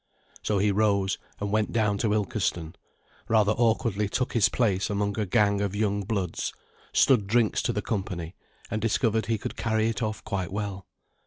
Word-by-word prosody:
So 105 Hz, -, 0 dB
he 100 Hz, +1 st, +3 dB
rose 100 Hz, -2 st, +1 dB, 0.2 s
and 100 Hz, 0 st, -3 dB
went 110 Hz, 0 st, +1 dB
down 105 Hz, -3 st, +1 dB
to 110 Hz, -, +1 dB
Ilkeston, 100 Hz, -6 st, -1 dB, 0.6 s
rather 110 Hz, -2 st, +4 dB
awkwardly 110 Hz, -2 st, +1 dB
took 125 Hz, +3 st, -1 dB
his 115 Hz, -4 st, +4 dB
place 100 Hz, -6 st, +1 dB
among 100 Hz, 0 st, -1 dB
a 105 Hz, -, -1 dB
gang 100 Hz, +2 st, +2 dB
of 100 Hz, -1 st, -1 dB
young 105 Hz, -1 st, 0 dB
bloods, 100 Hz, -4 st, -2 dB, 0.4 s
stood 115 Hz, -7 st, +4 dB
drinks 115 Hz, 0 st, +2 dB
to -, -, 0 dB
the -, -, -2 dB
company, 90 Hz, -5 st, -3 dB, 0.4 s
and 110 Hz, 0 st, -1 dB
discovered 115 Hz, 0 st, +1 dB
he 115 Hz, -1 st, +1 dB
could -, -, -6 dB
carry 110 Hz, -1 st, +1 dB
it 110 Hz, -3 st, -3 dB
off 110 Hz, -1 st, -3 dB
quite 95 Hz, -4 st, -3 dB
well. 100 Hz, -1 st, -4 dB
105 Hz, 175 wpm, -27 LUFS, 100-110 Hz, 0.6 s, rather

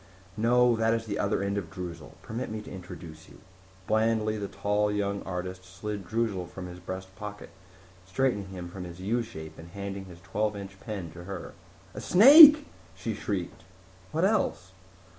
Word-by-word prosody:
"No, 120 Hz, +2 st, +4 dB
that 115 Hz, 0 st, +2 dB
is 115 Hz, 0 st, -3 dB
the 105 Hz, -2 st, -3 dB
other 100 Hz, 0 st, 0 dB
end 100 Hz, +1 st, -1 dB
of 85 Hz, -5 st, -8 dB
Droozle. 85 Hz, -6 st, -8 dB
Permit 120 Hz, +3 st, -5 dB
me 110 Hz, 0 st, -4 dB
to -, -, -11 dB
introduce 85 Hz, -4 st, -10 dB
you." -, -, -15 dB, 0.5 s
Blandly 110 Hz, 0 st, +1 dB
the 105 Hz, -2 st, -4 dB
tall, 105 Hz, +2 st, 0 dB
young 100 Hz, -1 st, -1 dB
artist 90 Hz, 0 st, -5 dB
slid 95 Hz, +1 st, -6 dB
Droozle 105 Hz, -4 st, -1 dB
from 90 Hz, +1 st, -8 dB
his 90 Hz, 0 st, -9 dB
breast 95 Hz, +1 st, -7 dB
pocket, 105 Hz, +2 st, -8 dB, 0.6 s
straightened 100 Hz, 0 st, 0 dB
him 90 Hz, -2 st, -7 dB
from 90 Hz, +1 st, -8 dB
his 90 Hz, 0 st, -9 dB
U 110 Hz, +6 st, 0 dB
shape 80 Hz, -9 st, -9 dB
and 80 Hz, +1 st, -11 dB
handed 100 Hz, +1 st, -6 dB
his 90 Hz, -2 st, -12 dB
twelve 105 Hz, +2 st, -1 dB
inch 100 Hz, -1 st, -9 dB
pen 95 Hz, -7 st, -6 dB
to 85 Hz, +1 st, -11 dB
her. 95 Hz, -2 st, -7 dB, 0.4 s
"A -, -, -7 dB
snake!" 295 Hz, -, +10 dB, 0.3 s
she 115 Hz, -, -4 dB
shrieked. 100 Hz, -5 st, -4 dB, 0.5 s
"What 160 Hz, +4 st, +1 dB
else?" 195 Hz, -, 0 dB
100 Hz, 175 wpm, -28 LUFS, 90-110 Hz, 0.6 s, snake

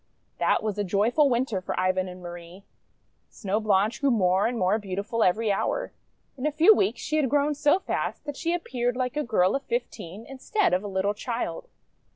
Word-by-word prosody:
That -, -, +2 dB
was 210 Hz, -2 st, -2 dB
a -, -, +1 dB
joyful 215 Hz, -, +2 dB
Winter 235 Hz, -5 st, 0 dB
for -, -, -3 dB
Ivan 185 Hz, 0 st, +1 dB
and 180 Hz, 0 st, -10 dB
Marie. 175 Hz, +2 st, -10 dB, 0.7 s
Snow 205 Hz, 0 st, -2 dB
Blanche 210 Hz, +2 st, +1 dB
grew 280 Hz, -, +3 dB
more 190 Hz, -4 st, +3 dB
and 240 Hz, 0 st, -3 dB
more 195 Hz, +2 st, +2 dB
beautiful 205 Hz, +3 st, -3 dB
every 215 Hz, +4 st, +2 dB
hour. -, -, -1 dB, 0.4 s
In 270 Hz, +2 st, -2 dB
a -, -, 0 dB
few 320 Hz, +8 st, +6 dB
weeks 225 Hz, -, 0 dB
she 310 Hz, +3 st, -1 dB
had 285 Hz, -4 st, +1 dB
grown 290 Hz, +2 st, +2 dB
so 295 Hz, +3 st, +3 dB
fast 385 Hz, -, -3 dB
that 290 Hz, -1 st, -5 dB
she 335 Hz, +4 st, -2 dB
appeared 245 Hz, -7 st, -2 dB
like 255 Hz, 0 st, -2 dB
a 300 Hz, -, 0 dB
girl 200 Hz, -6 st, +2 dB
of 275 Hz, -, -1 dB
fifteen 225 Hz, -, -5 dB
in 270 Hz, -1 st, -10 dB
stead 415 Hz, -, +1 dB
of 185 Hz, +2 st, +1 dB
a -, -, -4 dB
little 195 Hz, +1 st, 0 dB
child. 245 Hz, -, -4 dB
225 Hz, 200 wpm, -26 LUFS, 190-280 Hz, 0.7 s, few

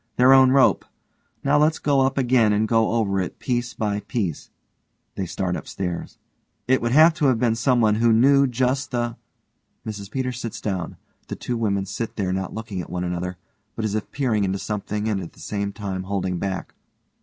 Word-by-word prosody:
Their 125 Hz, +2 st, +6 dB
own 130 Hz, -1 st, +7 dB
rope. 135 Hz, -1 st, +4 dB, 0.6 s
Now 145 Hz, +1 st, +3 dB
let's 155 Hz, +1 st, +3 dB
go 140 Hz, -2 st, +2 dB
up 135 Hz, +1 st, +1 dB
again 120 Hz, -5 st, +3 dB
and 105 Hz, +1 st, +1 dB
go 115 Hz, 0 st, +2 dB
over 100 Hz, -4 st, +1 dB
it 90 Hz, -, -5 dB
piece 120 Hz, -1 st, -2 dB
by 105 Hz, -2 st, -1 dB
piece. 100 Hz, -5 st, -3 dB, 0.6 s
(they 95 Hz, -, -4 dB
start 90 Hz, 0 st, -2 dB
upstairs) 90 Hz, -2 st, -5 dB, 0.5 s
It 130 Hz, +1 st, +3 dB
would 120 Hz, 0 st, 0 dB
have 160 Hz, +5 st, +7 dB
to 155 Hz, -, -1 dB
have 130 Hz, -3 st, +3 dB
been 115 Hz, -1 st, +2 dB
someone 115 Hz, -2 st, +2 dB
who 115 Hz, +2 st, +3 dB
knew 140 Hz, +5 st, +5 dB
just 130 Hz, +2 st, 0 dB
the 120 Hz, -2 st, -2 dB, 0.7 s
(MRS 100 Hz, -2 st, -6 dB
PETERS 125 Hz, 0 st, -3 dB
_sits 115 Hz, -, -5 dB
down. 95 Hz, -5 st, -4 dB, 0.3 s
The -, -, -5 dB
two 125 Hz, -, -4 dB
women 100 Hz, -4 st, 0 dB
sit 115 Hz, +3 st, -5 dB
there 95 Hz, -3 st, -1 dB
not 95 Hz, -1 st, -3 dB
looking 110 Hz, -4 st, -5 dB
at -, -, -9 dB
one 90 Hz, 0 st, -3 dB
another, 90 Hz, 0 st, -3 dB, 0.4 s
but 110 Hz, -, -3 dB
as 105 Hz, -, -1 dB
if 110 Hz, -1 st, -3 dB
peering 120 Hz, -7 st, 0 dB
into 95 Hz, 0 st, 0 dB
something 105 Hz, +1 st, -3 dB
and 105 Hz, -3 st, 0 dB
at 85 Hz, -, -9 dB
the -, -, -19 dB
same 100 Hz, -1 st, -3 dB
time 100 Hz, -3 st, -4 dB
holding 95 Hz, -2 st, -2 dB
back. 95 Hz, -2 st, -4 dB
110 Hz, 195 wpm, -23 LUFS, 100-125 Hz, 0.7 s, own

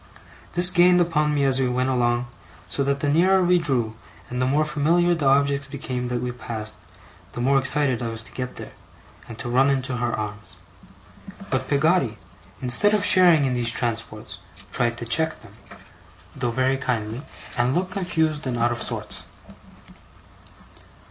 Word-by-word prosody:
This 180 Hz, +1 st, +6 dB
gained 180 Hz, 0 st, +5 dB
upon 150 Hz, -3 st, +1 dB
me 140 Hz, -, +1 dB
as 135 Hz, -1 st, +3 dB
we 130 Hz, -1 st, +1 dB
went 125 Hz, +1 st, -1 dB
along; 120 Hz, -1 st, 0 dB, 0.4 s
so 140 Hz, -, -2 dB
that 140 Hz, 0 st, -1 dB
the 145 Hz, -, 0 dB
nearer 185 Hz, +6 st, +3 dB
we 180 Hz, 0 st, +3 dB
drew, 125 Hz, -9 st, -1 dB, 0.4 s
the 125 Hz, +1 st, -1 dB
more 150 Hz, +3 st, +1 dB
familiar 165 Hz, +4 st, +1 dB
the 160 Hz, -5 st, -1 dB
objects 140 Hz, 0 st, +2 dB
became 130 Hz, -3 st, -4 dB
that 120 Hz, 0 st, -3 dB
we 125 Hz, -, -2 dB
passed, 110 Hz, -3 st, -4 dB, 0.6 s
the -, -, -6 dB
more 135 Hz, +3 st, +3 dB
excited 135 Hz, -2 st, +3 dB
I 120 Hz, -, -3 dB
was 115 Hz, 0 st, -5 dB
to 105 Hz, -, -8 dB
get 125 Hz, -1 st, -6 dB
there, -, -, -9 dB, 0.6 s
and 115 Hz, -, -9 dB
to 120 Hz, -, -6 dB
run 130 Hz, +3 st, +3 dB
into 130 Hz, -2 st, -1 dB
her 120 Hz, 0 st, -1 dB
arms. 105 Hz, -3 st, -4 dB, 1.0 s
But -, -, -1 dB
Peggotty, 145 Hz, -5 st, +1 dB, 0.5 s
instead 205 Hz, +13 st, +4 dB
of 205 Hz, -1 st, +2 dB
sharing 175 Hz, -7 st, +6 dB
in 130 Hz, -, 0 dB
those 120 Hz, -1 st, +2 dB
transports, 115 Hz, -1 st, -3 dB, 0.3 s
tried 120 Hz, -1 st, 0 dB
to 120 Hz, -, -6 dB
check 160 Hz, +7 st, +1 dB
them -, -, -15 dB, 0.8 s
(though 125 Hz, -3 st, -2 dB
very 130 Hz, +3 st, 0 dB
kindly), 115 Hz, -2 st, -3 dB, 0.3 s
and 120 Hz, +2 st, +1 dB
looked 185 Hz, +1 st, -1 dB
confused 160 Hz, -6 st, -1 dB
and 125 Hz, -2 st, -2 dB
out 120 Hz, +1 st, +1 dB
of 120 Hz, -2 st, -4 dB
sorts. -, -, -3 dB
135 Hz, 170 wpm, -23 LUFS, 120-155 Hz, 1.0 s, This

